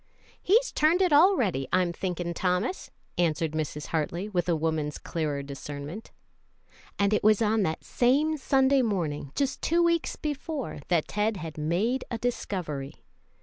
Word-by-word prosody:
"He's 455 +7 +3
turned 315 +4 +3
it 360 -5 +2
already, 255 - +4
I'm 180 -2 +2
thinking, 175 -1 -3
Thomas," 180 - -1 0.3
answered 160 -2 +1
Mrs. 150 -1 -4
Hartley, 170 +4 -2
with 180 -3 -1
a 170 - +3
woman's 155 -2 -1
clearer 150 -4 -3
discernment. 145 +7 -7 0.9
And 200 +1 +2
it - - +1
was 215 -1 +5
on 220 -1 +2
that 160 -5 -1
same 285 +6 +2
Sunday 270 0 +3
morning, 165 - -2
just 270 -2 -1
two 340 +2 +2
weeks 335 -1 +1
before, 295 - -4
that 170 -4 +1
Ted 210 0 0
had 160 -2 -7
made 185 +12 0
a 235 - -2
discovery. 180 - -3
190 Hz, 145 wpm, -27 LUFS, 155-265 Hz, 0.9 s, was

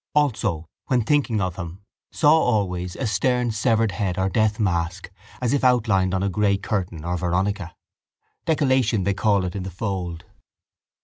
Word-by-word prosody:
Also, 110 - +1 0.2
when 125 -3 +2
thinking 130 -3 +1
of 95 -3 -2
him, 90 +2 -7 0.3
saw 150 -2 +4
always 95 - +1
a 135 - -3
stern 120 +3 +1
severed 110 0 +1
head 90 -1 -2
or 95 0 +1
death 110 +3 +1
mask 90 -1 -1 0.3
as 125 0 0
if 140 - +1
outlined 105 -7 +3
on 95 - 0
a - - +1
grey 100 +1 +2
curtain 90 -6 -3
or 90 +1 -1
veronica. 90 0 -1 0.7
Decollation 130 - +2
they 100 +2 +1
call 100 -1 +2
it 90 - -4
in 100 - -3
the 95 - -5
fold. 90 -3 -4
100 Hz, 165 wpm, -23 LUFS, 90-115 Hz, 0.7 s, saw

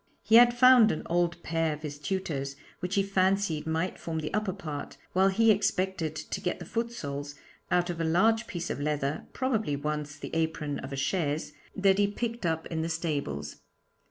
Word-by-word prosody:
He 225 - +6
had 240 0 +8
found 250 -3 +7
an - - -3
old 170 0 +1
pair 165 -1 0
of 150 +1 -9
his 145 -1 -6
tutor's, 145 -6 -3 0.2
which 180 +3 -3
he 200 - +3
fancied 190 -5 +1
might 160 +3 -1
form 165 -1 -4
the 155 -1 -3
upper 210 -1 0
part, 150 -5 -6 0.2
while 190 +1 +4
he 225 +3 +4
expected 190 -5 0
to - - -5
get 180 - -1
the - - -8
foot 235 0 -2
soles 145 -8 -5 0.3
out 175 0 +2
of 165 -1 -4
a - - +1
large 220 +8 +3
piece 175 -2 -4
of - - -4
leather 150 0 -1
probably 225 - 0
once 150 0 -3
the - - -8
apron 160 -3 -1
of 135 - -7
a - - -3
'chaise' 150 0 -1 0.2
that 195 0 +3
he 205 - +4
picked 230 -1 -3
up 160 0 -1
in 160 -1 -3
the 165 - -2
stables. 140 - -3
165 Hz, 195 wpm, -29 LUFS, 150-195 Hz, 0.3 s, had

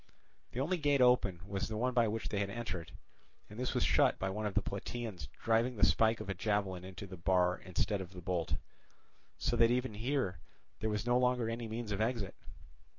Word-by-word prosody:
The 125 - -3
only 165 +7 +1
gate 145 -2 +3
open 125 -8 +4
was 100 -1 -2
the 110 - -4
one 125 +3 +1
by 120 -2 +4
which 110 +1 -2
they 100 - -1
had 100 -1 0
entered, 95 -7 -4 0.6
and 105 - -8
this 125 - -1
was - - +2
shut - - +4
by 95 0 -1
one 105 +2 -2
of 100 - -5
the 105 - +4
Plataeans 100 - -5 0.2
driving 115 +2 +2
the - - +6
spike 110 +1 +3
of - - -6
a 100 - -1
javelin 95 -2 -1
into 95 +2 -7
the 95 -1 -9
bar 90 +1 +2
instead 95 +2 0
of 95 0 -8
the 90 - -8
bolt; 85 -4 -1 0.8
so - - 0
that 115 0 +6
even 125 -1 0
here 110 - -1 0.4
there 110 - 0
was 105 0 -1
no 120 0 +3
longer 125 -2 +2
any 115 0 -4
means 110 0 -4
of 100 +1 -1
exit. 110 -4 -1
110 Hz, 215 wpm, -34 LUFS, 95-120 Hz, 0.8 s, the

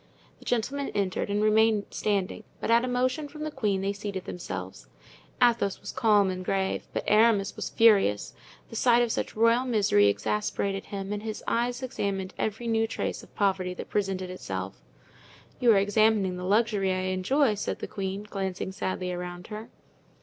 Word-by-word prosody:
The - - -16
gentlemen 270 +4 -1
entered 195 -2 -1
and 205 +1 +1
remained 215 -1 +4
standing, 200 -3 -1 0.2
but - - -1
at 235 +1 +5
a - - -1
motion 255 +4 0
from 305 +1 -8
the 310 - -3
queen 210 -8 0
they 195 +1 -1
seated 200 -2 -5
themselves. 180 - -6 0.5
Athos 235 -5 +3
was - - -7
calm 205 -4 +3
and 185 0 -5
grave, 190 +1 -1
but - - -2
Aramis 210 -2 +4
was - - -4
furious; 200 - +4 0.4
the - - -8
sight 240 +1 +4
of 235 - -1
such - - -3
royal 230 +3 +4
misery 205 - +3
exasperated 195 - -1
him 195 0 -5
and 205 - -4
his 215 -1 -5
eyes 240 +2 0
examined 200 -7 -3
every 220 +2 -2
new 225 -1 +1
trace - - -3
of - - -18
poverty 190 -3 0
that - - -8
presented 190 -3 -1
itself. 185 - -6 0.8
"You 245 -3 +5
are - - +4
examining 205 -1 +3
the 180 0 -5
luxury 205 -1 +2
I 185 0 -1
enjoy," 235 +7 +2
said 205 - -3
the - - -5
queen, 195 +1 -4
glancing 190 -2 -3
sadly 185 -1 -3
around 180 0 -6
her. 215 +1 -7
205 Hz, 175 wpm, -27 LUFS, 190-230 Hz, 0.8 s, at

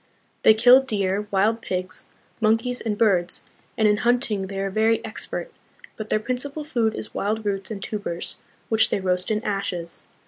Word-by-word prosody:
They 220 - +7
kill 245 +4 +7
deer, 205 -5 -1
wild 210 +4 +2
pigs, 185 -2 -4 0.3
monkeys, 225 +3 +1
and 210 -2 -2
birds, 185 -6 +2 0.3
and 220 - +4
in 210 0 +3
hunting 235 -4 +1
they 195 0 -5
are 195 0 -2
very 220 +2 +3
expert; 220 - -6 0.4
but 215 -1 -7
their - - +3
principal 265 +6 -3
food 235 -7 0
is - - -7
wild 215 +2 -2
roots 195 -2 -1
and 200 -3 -5
tubers, 205 -5 -4 0.3
which 220 -1 +3
they - - 0
roast 180 -1 0
in 215 0 0
ashes. 180 -4 -3
215 Hz, 170 wpm, -24 LUFS, 195-225 Hz, 0.4 s, They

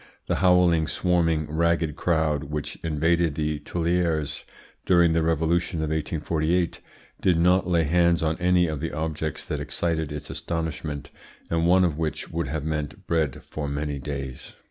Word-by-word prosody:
The - - 0
howling, 90 -4 +4
swarming, 85 -3 +1
ragged 80 0 0
crowd 80 -4 +1
which 75 0 -4
invaded 80 0 +1
the 75 -1 -1
Tuileries 85 -1 -1 0.4
during 85 -2 +4
the 80 - +2
revolution 80 +1 +1
of 80 0 -1
1848 80 +2 0 0.4
did 90 -3 +3
not 90 +2 +3
lay 85 -2 +3
hands 85 +1 +3
on 80 0 +1
any 90 0 +3
of 80 -3 -3
the 80 +2 -4
objects 80 -1 -3
that - - -3
excited 80 -3 -1
its 75 -1 -6
astonishment, 80 -3 -4 0.4
and 85 0 +2
one 95 +1 +5
of 80 -3 -1
which 75 -2 -3
would 85 0 -2
have 80 -2 -3
meant 75 -2 -3
bread 80 -6 0
for 75 -2 -5
many 75 0 -3
days. 70 -2 -6
80 Hz, 155 wpm, -25 LUFS, 75-85 Hz, 0.4 s, one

